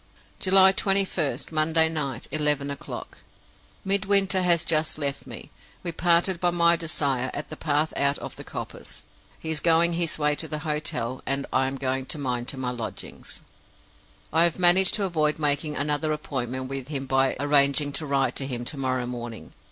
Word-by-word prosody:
"July 190 Hz, 0 st, +6 dB
21st, 195 Hz, -8 st, 0 dB
Monday 160 Hz, +1 st, +3 dB
night, 140 Hz, -6 st, -3 dB
eleven 150 Hz, -2 st, +2 dB
o'clock. 140 Hz, -, -8 dB, 0.7 s
Midwinter 195 Hz, -1 st, +2 dB
has 175 Hz, -2 st, +2 dB
just 155 Hz, -1 st, +1 dB
left 140 Hz, -2 st, -2 dB
me. -, -, -9 dB, 0.3 s
We 175 Hz, -, -2 dB
parted 170 Hz, +2 st, +2 dB
by 175 Hz, -, +2 dB
my 170 Hz, -1 st, +4 dB
desire 140 Hz, -6 st, -1 dB
at 145 Hz, -, -5 dB
the 155 Hz, -, -6 dB
path 150 Hz, 0 st, -1 dB
out 140 Hz, 0 st, +1 dB
of -, -, -8 dB
the -, -, -8 dB
coppice; -, -, -7 dB, 0.3 s
he 160 Hz, 0 st, -3 dB
going 165 Hz, +2 st, +3 dB
his 170 Hz, -1 st, 0 dB
way 150 Hz, -1 st, +2 dB
to 160 Hz, -, -4 dB
the 155 Hz, -, -2 dB
hotel, 145 Hz, -5 st, -2 dB
and 140 Hz, +1 st, -1 dB
I 130 Hz, 0 st, +2 dB
going 130 Hz, -1 st, -3 dB
mine 125 Hz, -4 st, -2 dB
to 135 Hz, -, -4 dB
my 125 Hz, -1 st, -2 dB
lodgings. 120 Hz, -3 st, -8 dB, 0.9 s
"I 165 Hz, +1 st, +5 dB
have 170 Hz, -, 0 dB
managed 185 Hz, +1 st, +5 dB
to 210 Hz, -, -1 dB
avoid 155 Hz, -5 st, +1 dB
making 150 Hz, 0 st, 0 dB
another 150 Hz, +2 st, 0 dB
appointment 130 Hz, -4 st, -3 dB
with 135 Hz, -1 st, -5 dB
him 140 Hz, -2 st, -4 dB
by 135 Hz, 0 st, +2 dB
arranging 145 Hz, 0 st, +3 dB
to 155 Hz, -, -2 dB
write 135 Hz, -1 st, 0 dB
to 135 Hz, -, -4 dB
him 120 Hz, -2 st, -4 dB
to 145 Hz, -, -3 dB
morrow 130 Hz, -2 st, -1 dB
morning. 120 Hz, -7 st, -7 dB
150 Hz, 170 wpm, -25 LUFS, 135-170 Hz, 0.9 s, July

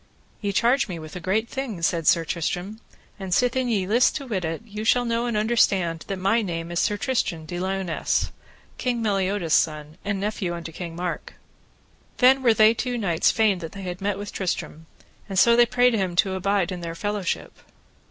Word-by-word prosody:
Ye 205 Hz, -2 st, -1 dB
charge 240 Hz, +5 st, +2 dB
me 180 Hz, -4 st, -5 dB
with 155 Hz, 0 st, -9 dB
a -, -, -4 dB
great 200 Hz, +6 st, 0 dB
thing, 240 Hz, -10 st, -5 dB
said 165 Hz, -2 st, 0 dB
Sir 165 Hz, -1 st, +4 dB
Tristram, 180 Hz, +6 st, -3 dB, 0.4 s
and 190 Hz, -2 st, -6 dB
sithen 250 Hz, +2 st, +1 dB
ye 200 Hz, -5 st, +1 dB
list 235 Hz, +6 st, +3 dB
to 280 Hz, -, -4 dB
wit 205 Hz, -8 st, -2 dB
it, 165 Hz, +5 st, -3 dB
ye 210 Hz, -1 st, -6 dB
shall 245 Hz, +2 st, +3 dB
know 235 Hz, +1 st, 0 dB
and 235 Hz, -3 st, -1 dB
understand 195 Hz, -7 st, +1 dB
that 195 Hz, -, -3 dB
my 195 Hz, +5 st, +2 dB
name 170 Hz, -4 st, -4 dB
is 175 Hz, -, -1 dB
Sir 210 Hz, -, +1 dB
Tristram 205 Hz, -, -1 dB
de 175 Hz, +2 st, -5 dB
Liones, 190 Hz, -2 st, -1 dB, 0.5 s
King 240 Hz, -2 st, -1 dB
Meliodas' 195 Hz, -5 st, 0 dB
son, 155 Hz, +1 st, 0 dB
and 200 Hz, -1 st, -2 dB
nephew 195 Hz, -4 st, -2 dB
unto 165 Hz, -1 st, -7 dB
King 165 Hz, 0 st, -7 dB
Mark. 175 Hz, -2 st, -4 dB, 0.8 s
Then 265 Hz, +1 st, +5 dB
were 235 Hz, -3 st, +4 dB
they 215 Hz, +1 st, +6 dB
two 245 Hz, +1 st, -2 dB
knights 175 Hz, -7 st, +2 dB
fain 215 Hz, -4 st, +2 dB
that 165 Hz, -2 st, -7 dB
they 195 Hz, -, -8 dB
had 180 Hz, 0 st, -5 dB
met 200 Hz, 0 st, -1 dB
with 205 Hz, 0 st, -7 dB
Tristram, 165 Hz, -4 st, -4 dB, 0.4 s
and 195 Hz, -, -4 dB
so 235 Hz, +5 st, +6 dB
they 240 Hz, 0 st, +5 dB
prayed 245 Hz, 0 st, +3 dB
him 190 Hz, -5 st, -1 dB
to 190 Hz, +2 st, +2 dB
abide 190 Hz, 0 st, 0 dB
in 180 Hz, -1 st, -5 dB
their 165 Hz, -1 st, -5 dB
fellowship. 205 Hz, 0 st, -3 dB
195 Hz, 200 wpm, -24 LUFS, 175-225 Hz, 0.8 s, they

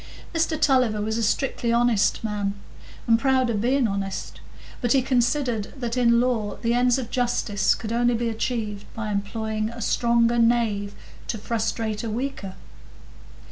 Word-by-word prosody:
Mr 330 Hz, -1 st, 0 dB
Tulliver 255 Hz, -7 st, +3 dB
was 220 Hz, +2 st, -1 dB
a -, -, 0 dB
strictly 235 Hz, +1 st, 0 dB
honest 235 Hz, -3 st, +2 dB
man, 205 Hz, -2 st, -2 dB, 0.5 s
and 230 Hz, -1 st, +4 dB
proud 260 Hz, -2 st, +2 dB
of 210 Hz, -3 st, -1 dB
being 255 Hz, +1 st, +2 dB
honest, 195 Hz, -1 st, -4 dB, 0.4 s
but 240 Hz, -2 st, +2 dB
he 270 Hz, -, +4 dB
considered 245 Hz, -4 st, 0 dB
that 240 Hz, -2 st, -3 dB
in 235 Hz, -2 st, +4 dB
law 235 Hz, -4 st, 0 dB
the 230 Hz, 0 st, +2 dB
ends 245 Hz, +1 st, +3 dB
of 245 Hz, -3 st, -5 dB
justice 240 Hz, -5 st, +1 dB
could 220 Hz, -, -6 dB
only 240 Hz, 0 st, +2 dB
be 235 Hz, +1 st, -1 dB
achieved 220 Hz, -3 st, -3 dB
by 220 Hz, -1 st, -3 dB
employing 215 Hz, +2 st, -2 dB
a 235 Hz, 0 st, -9 dB
stronger 235 Hz, +1 st, +2 dB
knave 225 Hz, -4 st, +1 dB, 0.3 s
to 225 Hz, -, -2 dB
frustrate 220 Hz, 0 st, -2 dB
a 230 Hz, -, -3 dB
weaker. 220 Hz, -5 st, -4 dB
230 Hz, 155 wpm, -24 LUFS, 215-245 Hz, 0.5 s, and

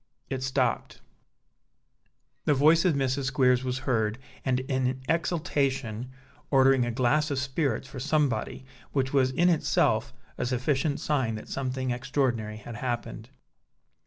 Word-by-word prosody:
It 130 Hz, -1 st, -2 dB
stopped. 130 Hz, 0 st, -1 dB, 1.5 s
The 150 Hz, -, +3 dB
voice 155 Hz, +5 st, +5 dB
of 175 Hz, -5 st, +3 dB
Mrs. 135 Hz, 0 st, 0 dB
Squeers 130 Hz, -1 st, +3 dB
was 130 Hz, 0 st, -2 dB
heard, 110 Hz, -3 st, +1 dB, 0.3 s
and 130 Hz, -1 st, +1 dB
in 130 Hz, -1 st, -1 dB
exultation, 140 Hz, -8 st, -1 dB, 0.4 s
ordering 135 Hz, -2 st, +4 dB
a -, -, -1 dB
glass 130 Hz, +6 st, +2 dB
of 140 Hz, -, -1 dB
spirits 135 Hz, -1 st, -1 dB
for 130 Hz, -, -8 dB
somebody, 135 Hz, -3 st, 0 dB, 0.3 s
which 130 Hz, -1 st, 0 dB
was 130 Hz, -2 st, +4 dB
in 170 Hz, +7 st, +2 dB
itself 170 Hz, -3 st, +2 dB, 0.3 s
a -, -, 0 dB
sufficient 135 Hz, +3 st, 0 dB
sign 130 Hz, -7 st, 0 dB
that 110 Hz, -, -9 dB
something 130 Hz, -1 st, -2 dB
extraordinary 120 Hz, -3 st, -1 dB
had 110 Hz, +1 st, -8 dB
happened. 120 Hz, -1 st, -4 dB
130 Hz, 130 wpm, -27 LUFS, 125-140 Hz, 1.5 s, voice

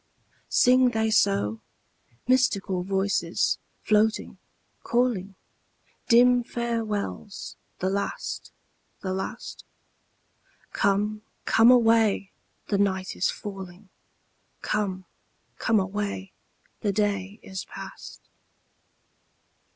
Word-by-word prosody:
Sing 255 Hz, 0 st, +5 dB
they 220 Hz, -2 st, 0 dB
so? 105 Hz, -, +2 dB, 0.7 s
Mystical 205 Hz, -7 st, +2 dB
voices, 190 Hz, -2 st, 0 dB, 0.2 s
floating, 215 Hz, +1 st, +1 dB, 0.4 s
calling; 230 Hz, -6 st, 0 dB, 0.7 s
Dim 245 Hz, +1 st, +6 dB
farewells 225 Hz, -4 st, -3 dB, 0.2 s
the 185 Hz, -, -1 dB
last, 200 Hz, 0 st, -3 dB, 0.5 s
the 185 Hz, -1 st, -2 dB
last? 190 Hz, -, -5 dB, 1.1 s
Come, 210 Hz, +2 st, +1 dB, 0.2 s
come 225 Hz, +2 st, +6 dB
away, 225 Hz, -5 st, +4 dB, 0.3 s
the 200 Hz, -, 0 dB
night 190 Hz, -2 st, 0 dB
is -, -, +1 dB
falling; 195 Hz, -1 st, -8 dB, 0.7 s
'Come, 190 Hz, -3 st, -1 dB, 0.5 s
come 225 Hz, -2 st, +3 dB
away, 195 Hz, 0 st, -3 dB, 0.5 s
the 205 Hz, -, 0 dB
day 200 Hz, 0 st, -1 dB
is 190 Hz, -1 st, -6 dB
past.' -, -, -10 dB
205 Hz, 80 wpm, -26 LUFS, 190-225 Hz, 1.1 s, Dim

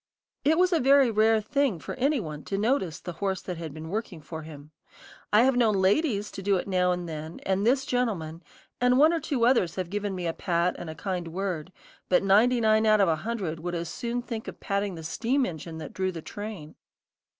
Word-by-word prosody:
It 310 Hz, +3 st, +3 dB
was 365 Hz, 0 st, +3 dB
a 335 Hz, -, +3 dB
very 270 Hz, -2 st, +5 dB
rare 220 Hz, +1 st, +4 dB
thing 280 Hz, -3 st, 0 dB
for -, -, -7 dB
any 275 Hz, +2 st, +1 dB
one 155 Hz, -6 st, -6 dB
to 195 Hz, -, -2 dB
notice 210 Hz, -, 0 dB
the 175 Hz, -, -6 dB
horse 190 Hz, -2 st, 0 dB
that 180 Hz, -2 st, -5 dB
had 160 Hz, -2 st, -5 dB
been 155 Hz, +2 st, -8 dB
working 205 Hz, -3 st, -4 dB
for 160 Hz, +1 st, -8 dB
him. 150 Hz, -1 st, -11 dB, 0.6 s
I 215 Hz, +3 st, +6 dB
have 265 Hz, 0 st, +3 dB
known 230 Hz, -4 st, +3 dB
ladies 205 Hz, +2 st, +1 dB
to -, -, -7 dB
do 200 Hz, +1 st, +2 dB
it 180 Hz, -, -4 dB
now 180 Hz, -2 st, +2 dB
and 180 Hz, -1 st, -3 dB
then, 155 Hz, 0 st, -6 dB
and 195 Hz, +3 st, +1 dB
this 265 Hz, +2 st, +3 dB
gentleman, 180 Hz, -10 st, -2 dB, 0.4 s
and 250 Hz, 0 st, +4 dB
one 310 Hz, +4 st, +6 dB
or 335 Hz, -, +1 dB
two 270 Hz, -6 st, 0 dB
others 235 Hz, -9 st, +3 dB
have 185 Hz, -2 st, -4 dB
given 205 Hz, -1 st, -2 dB
me 180 Hz, -1 st, -4 dB
a 165 Hz, -, -1 dB
pat 175 Hz, +1 st, 0 dB
and 170 Hz, -, -6 dB
a 160 Hz, -, -6 dB
kind 180 Hz, -2 st, -3 dB
word; 180 Hz, -1 st, -4 dB, 0.4 s
but 180 Hz, -, +4 dB
ninety 220 Hz, +6 st, +4 dB
nine 220 Hz, -1 st, +3 dB
out 215 Hz, 0 st, +5 dB
of 195 Hz, -3 st, +4 dB
a 160 Hz, -, +2 dB
hundred 185 Hz, -4 st, -3 dB
would 175 Hz, +2 st, -4 dB
as 170 Hz, -1 st, -3 dB
soon 240 Hz, +6 st, -3 dB
think 225 Hz, -2 st, -6 dB
of -, -, -8 dB
patting 200 Hz, -2 st, -2 dB
the 160 Hz, -, -8 dB
steam 245 Hz, -, 0 dB
engine 160 Hz, -2 st, -6 dB
that 160 Hz, -, -8 dB
drew 190 Hz, 0 st, -1 dB
the 165 Hz, -3 st, -8 dB
train. 205 Hz, -8 st, -7 dB
195 Hz, 230 wpm, -27 LUFS, 170-235 Hz, 0.6 s, I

